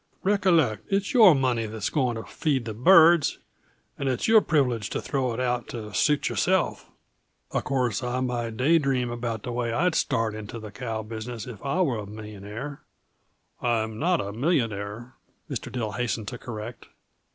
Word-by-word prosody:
"Recollect, 185 Hz, -, +2 dB
it's 200 Hz, +7 st, 0 dB
your 215 Hz, -, +8 dB
money 125 Hz, -4 st, +1 dB
that's 110 Hz, -1 st, -3 dB
going 125 Hz, -5 st, +1 dB
to 110 Hz, -, -5 dB
feed 130 Hz, -, -1 dB
the 110 Hz, -, -4 dB
birds 165 Hz, -, +6 dB, 0.6 s
and 140 Hz, -, 0 dB
it's 125 Hz, -2 st, -1 dB
your 220 Hz, -1 st, +7 dB
privilege 125 Hz, -, +1 dB
to -, -, -2 dB
throw 130 Hz, -4 st, -1 dB
it 115 Hz, -, -4 dB
out 125 Hz, -1 st, -1 dB
to 110 Hz, -3 st, -7 dB
suit 150 Hz, -2 st, +2 dB
yourself. 190 Hz, -1 st, 0 dB, 0.6 s
Uh -, -, 0 dB
course, 125 Hz, -5 st, 0 dB
I 125 Hz, 0 st, -2 dB
might 120 Hz, -3 st, -2 dB
day 160 Hz, +6 st, +4 dB
dream 130 Hz, -4 st, 0 dB
about 115 Hz, -2 st, -4 dB
the 125 Hz, -, -4 dB
way 120 Hz, -1 st, -1 dB
I'd 170 Hz, +9 st, +1 dB
start 115 Hz, -8 st, 0 dB
into 110 Hz, +1 st, -7 dB
the 110 Hz, -2 st, -8 dB
cow 115 Hz, -1 st, -4 dB
business 110 Hz, +1 st, -6 dB
if 120 Hz, -5 st, -9 dB
I 140 Hz, +7 st, 0 dB
was 120 Hz, -, 0 dB
a -, -, -11 dB
millionaire 105 Hz, +6 st, -7 dB, 0.4 s
" -, -, -42 dB
"I'm 110 Hz, -2 st, 0 dB
not 175 Hz, +1 st, +2 dB
a 100 Hz, +1 st, -4 dB
millionaire," 115 Hz, -, -1 dB, 0.3 s
Mr. -, -, -5 dB
Dill 115 Hz, -4 st, -3 dB
hastened 115 Hz, -1 st, -2 dB
to 120 Hz, -, -8 dB
correct. 120 Hz, 0 st, -7 dB
120 Hz, 175 wpm, -26 LUFS, 110-140 Hz, 0.6 s, your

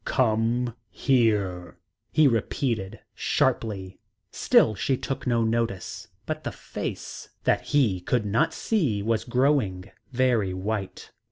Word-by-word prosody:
"Come 120 Hz, 0 st, +1 dB
here," 100 Hz, -, +1 dB, 0.3 s
he 155 Hz, -2 st, +5 dB
repeated 115 Hz, -3 st, -1 dB
sharply. 95 Hz, -4 st, -1 dB, 0.3 s
Still 110 Hz, -, +4 dB
she 130 Hz, +6 st, 0 dB
took 135 Hz, 0 st, -4 dB
no 120 Hz, -2 st, +2 dB
notice, 115 Hz, -4 st, -2 dB, 0.2 s
but -, -, -4 dB
the -, -, -3 dB
face -, -, -6 dB
that -, -, +2 dB
he 125 Hz, -11 st, +2 dB
could 110 Hz, +5 st, 0 dB
not 115 Hz, +11 st, +2 dB
see 150 Hz, -, 0 dB
was 110 Hz, 0 st, 0 dB
growing 120 Hz, -7 st, +1 dB, 0.2 s
very 120 Hz, -7 st, +1 dB
white. 95 Hz, 0 st, -4 dB
115 Hz, 115 wpm, -26 LUFS, 100-125 Hz, 0.3 s, he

